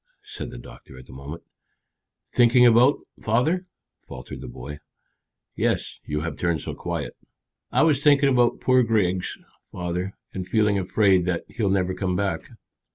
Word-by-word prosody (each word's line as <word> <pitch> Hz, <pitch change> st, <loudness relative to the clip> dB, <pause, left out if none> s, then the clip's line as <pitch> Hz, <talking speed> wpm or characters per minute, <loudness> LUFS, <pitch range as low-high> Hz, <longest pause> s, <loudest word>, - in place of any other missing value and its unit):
said -, -, -7 dB
the -, -, -9 dB
doctor 60 Hz, +2 st, -13 dB
at 65 Hz, -, -12 dB
that -, -, -14 dB
moment. 70 Hz, +5 st, -8 dB, 0.9 s
"Thinking 125 Hz, 0 st, +5 dB
about, 120 Hz, +4 st, +6 dB, 0.2 s
father?" 155 Hz, -, +1 dB, 0.3 s
faltered 60 Hz, 0 st, -9 dB
the -, -, -7 dB
boy. 65 Hz, +5 st, -8 dB, 0.8 s
"Yes; -, -, -1 dB
you 75 Hz, 0 st, -2 dB
have 80 Hz, -2 st, -5 dB
turned 85 Hz, -4 st, 0 dB
so -, -, -5 dB
quiet." -, -, -4 dB, 0.6 s
"I -, -, +3 dB
was 150 Hz, -4 st, +3 dB
thinking 145 Hz, -1 st, +5 dB
about 125 Hz, -2 st, +2 dB
poor 130 Hz, 0 st, +4 dB
Griggs, 100 Hz, -6 st, 0 dB, 0.3 s
father, 90 Hz, +2 st, -4 dB, 0.2 s
and 95 Hz, -1 st, -5 dB
feeling 105 Hz, 0 st, +2 dB
afraid 95 Hz, -1 st, +2 dB
that 90 Hz, -2 st, -1 dB
he'll 110 Hz, -4 st, -1 dB
never 95 Hz, -1 st, +1 dB
come 90 Hz, 0 st, -2 dB
back." 95 Hz, -4 st, -2 dB
95 Hz, 155 wpm, -24 LUFS, 85-120 Hz, 0.9 s, about